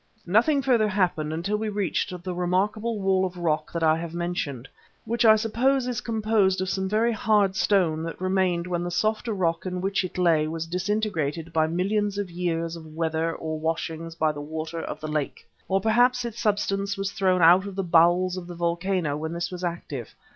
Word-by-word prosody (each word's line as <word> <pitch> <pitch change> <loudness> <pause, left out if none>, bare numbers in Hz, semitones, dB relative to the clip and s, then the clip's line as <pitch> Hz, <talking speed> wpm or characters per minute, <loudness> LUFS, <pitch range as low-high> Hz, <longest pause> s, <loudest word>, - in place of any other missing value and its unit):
Nothing 240 - +3
further 240 -5 +3
happened 180 -6 0
until 175 +6 -1
we 220 0 -2
reached 205 -3 -1
the 185 -1 -3
remarkable 205 +5 0
wall 190 -1 +2
of 185 -1 -3
rock 155 -3 -1
that 170 -1 -2
I 160 0 +4
have 170 0 -6
mentioned, 160 -7 -3 0.4
which 235 +1 0
I 220 -1 +8
suppose 240 +5 +1
is 250 -2 -2
composed 215 -4 +1
of 185 0 -1
some 190 0 -1
very 220 +3 +2
hard 205 -3 +2
stone 180 -4 +2
that 165 0 -5
remained 185 -2 +1
when 175 -1 -2
the 175 - -3
softer 215 +5 0
rock 170 -5 0
in 180 0 -3
which 195 +1 0
it 185 - -6
lay 165 -4 +3
was 165 +1 -3
disintegrated 170 -4 -2
by 160 -1 +3
millions 200 +4 0
of 200 -3 -3
years 170 -1 -2
of 160 -2 -11
weather 165 0 0
or 155 -1 -4
washings 165 +1 -3
by 155 -1 +1
the 145 -1 -7
water 160 +2 -5
of - - -6
the 155 - -5
lake. 150 -2 -3 0.2
Or 195 0 +2
perhaps 245 +4 +3
its 235 0 -5
substance 200 -2 0
was 195 0 -2
thrown 185 -3 +2
out 180 +4 +6
of 195 - -7
the 195 - -1
bowels 175 +2 +3
of 175 -1 -6
the 175 - -8
volcano 170 -2 -1
when 160 +2 -4
this 170 +1 -3
was 180 0 -6
active. 160 -8 -5
180 Hz, 200 wpm, -25 LUFS, 165-205 Hz, 0.4 s, I